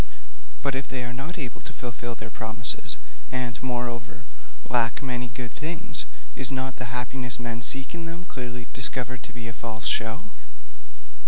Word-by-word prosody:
But 140 -1 +4
if 135 +1 0
they 130 -2 0
are 125 0 -2
not 140 +8 -2
able 130 -7 -2
to 130 - -4
fulfil 120 -1 -3
their 110 -1 -6
promises, 110 -1 +1 0.3
and, 125 -2 0
moreover, 120 -2 0 0.4
lack 120 +2 +4
many 125 -2 +1
good 125 -1 -3
things, 160 +2 -1 0.3
is 135 - +6
not 130 0 0
the 125 - -1
happiness 125 0 +1
men 120 -1 -1
seek 135 +4 +4
in 170 -1 -2
them 170 +2 -3
clearly 125 -5 -3
discovered 130 -1 0
to - - -7
be 120 -1 -4
a 115 - -3
false 115 0 -3
show? 115 +7 +4
125 Hz, 165 wpm, -30 LUFS, 120-130 Hz, 0.4 s, is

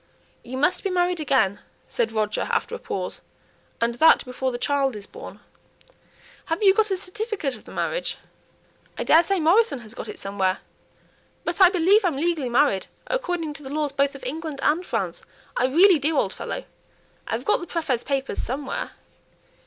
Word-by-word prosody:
"You 255 +2 -6
must 295 +7 +1
be 395 - 0
married 355 -1 +1
again," 255 -10 +2 0.3
said 230 -2 -1
Roger, 215 -1 -1
after - - 0
a 475 - -4
pause, - - -4 0.6
"and 235 +1 +1
that 300 +6 +5
before 255 +1 -2
the 240 - -3
child 275 -1 +1
is 205 -1 -8
born. - - -11 1.0
Have 325 +6 -2
you 385 -1 +7
got 430 +1 +2
a 385 - 0
certificate 390 - -3
of - - -16
the - - -12
marriage?" - - -2 0.8
"I - - -1
daresay 340 +5 +4
Morrison 360 +4 +4
has 220 -1 -10
got - - -7
it - - -7
somewhere. 195 -1 -1 0.9
But 340 +3 -2
I 370 - +10
believe 380 +4 +4
I'm 335 -7 +1
legally 315 -4 0
married 240 -6 +2 0.2
according 355 -11 -2
to 295 - -11
the 265 - -8
laws 295 0 -1
both 280 0 +1
of 270 - -11
England 305 +2 -5
and 320 +4 +2
France; - - -3 0.3
I 250 - +2
really 340 +5 +6
do, 300 +2 0
old - - +1
fellow. - - -5 0.6
I've - - -3
got 420 - +3
the 345 - -7
prÄfet's 290 -9 -1
papers 275 -1 -1
somewhere." 265 +2 -4
300 Hz, 175 wpm, -24 LUFS, 260-360 Hz, 1.0 s, I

